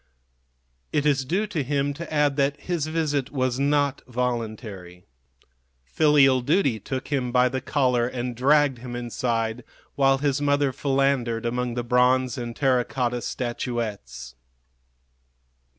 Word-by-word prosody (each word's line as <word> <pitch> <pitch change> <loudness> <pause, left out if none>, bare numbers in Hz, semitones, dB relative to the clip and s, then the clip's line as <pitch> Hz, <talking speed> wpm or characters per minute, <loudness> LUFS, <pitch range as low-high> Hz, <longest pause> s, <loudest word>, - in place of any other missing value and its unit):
It 150 - 0
is 140 -3 +2
due 190 +10 0
to 190 -7 -3
him 140 +1 -1
to 160 +2 -8
add 150 -2 +2
that 140 +1 0
his 170 -4 -2
visit 150 -4 -1
was 130 -2 -1
not 145 0 +1
voluntary. 110 -7 -4 0.8
Filial 135 - +4
duty 140 - +1
took 130 +5 -5
him 130 -4 -1
by 125 0 +4
the 130 +1 -3
collar 125 -3 +1
and 125 -1 -4
dragged 140 +1 +3
him 120 0 -7
inside, 120 -1 -2 0.3
while 135 -1 +3
his 140 0 0
mother 145 -1 +2
philandered 135 -4 0
among 125 0 -2
the 120 - -2
bronze 125 0 +2
and 120 -1 -5
terra 130 -3 +2
cotta 125 -1 -2
statuettes. 115 - -4
130 Hz, 135 wpm, -24 LUFS, 120-145 Hz, 0.8 s, Filial